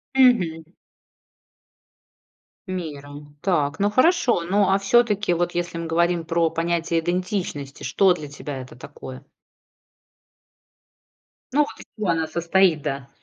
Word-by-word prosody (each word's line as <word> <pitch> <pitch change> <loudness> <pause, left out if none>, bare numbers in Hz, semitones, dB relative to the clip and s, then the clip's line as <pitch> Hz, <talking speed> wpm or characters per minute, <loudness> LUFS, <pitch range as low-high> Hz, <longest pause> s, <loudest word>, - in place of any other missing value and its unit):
Мгм. 190 -12 +4 2.0
Мира. 150 -6 -6 0.3
Так, 155 -5 0
ну 205 +1 +2
хорошо, 255 - +3
ну, 195 +3 +2
а 195 - +4
всё-таки, 210 -2 +2
вот 175 +1 -1
если 175 -1 -2
мы 165 - -4
говорим 170 +1 +1
про 165 0 +1
понятие 165 0 -1
идентичности, 175 -5 -3
что 180 +7 +3
для 155 -4 -7
тебя 145 -1 -7
это 130 -1 -12
такое? 130 0 -10 2.3
Ну, 290 - +1
вот - - -9
из - - -11
чего 205 -4 -2
она 160 -1 +1
состоит, 170 0 +2
да? 140 -2 -4
170 Hz, 120 wpm, -23 LUFS, 155-195 Hz, 2.3 s, Мгм